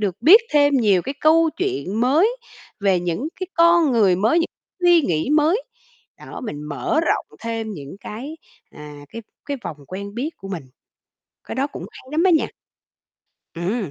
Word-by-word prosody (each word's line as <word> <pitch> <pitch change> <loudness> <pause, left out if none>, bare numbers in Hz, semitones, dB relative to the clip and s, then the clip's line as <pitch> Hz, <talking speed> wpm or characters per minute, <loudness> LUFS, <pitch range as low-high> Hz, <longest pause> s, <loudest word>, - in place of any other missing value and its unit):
được 195 -4 -1
biết 385 +10 +9
thêm 290 -1 +4
nhiều 205 -7 +3
cái 275 - -5
câu 320 +1 +4
chuyện 370 - -2
mới 320 - +3 0.4
về 195 -3 +2
những 175 - -2
cái 370 - -2
con 335 -3 +4
người 205 -6 +4
mới, 220 - +2
những 335 - +1 0.4
suy 350 -1 +6
nghĩ 165 - -1
mới. 315 +9 +3 0.6
Đó, - - -9
mình 150 -10 -6
mở 150 - -1
rộng 335 - 0
thêm 225 -1 -4
những 145 -2 -9
cái, 265 +12 -7 0.3
à, 150 -1 -11
cái 230 - -8 0.2
cái 285 - -2
vòng 155 - -5
quen 200 +4 -7
biết 265 +7 -3
của 195 - -10
mình. 180 -5 -5 0.8
Cái - - -7
đó 270 +2 0
cũng - - -8
hay - - -14
lắm 315 +3 +1
á 375 - +5
nha. 320 - +3 1.1
Ừm. 185 +2 -2
235 Hz, 175 wpm, -21 LUFS, 190-320 Hz, 1.1 s, biết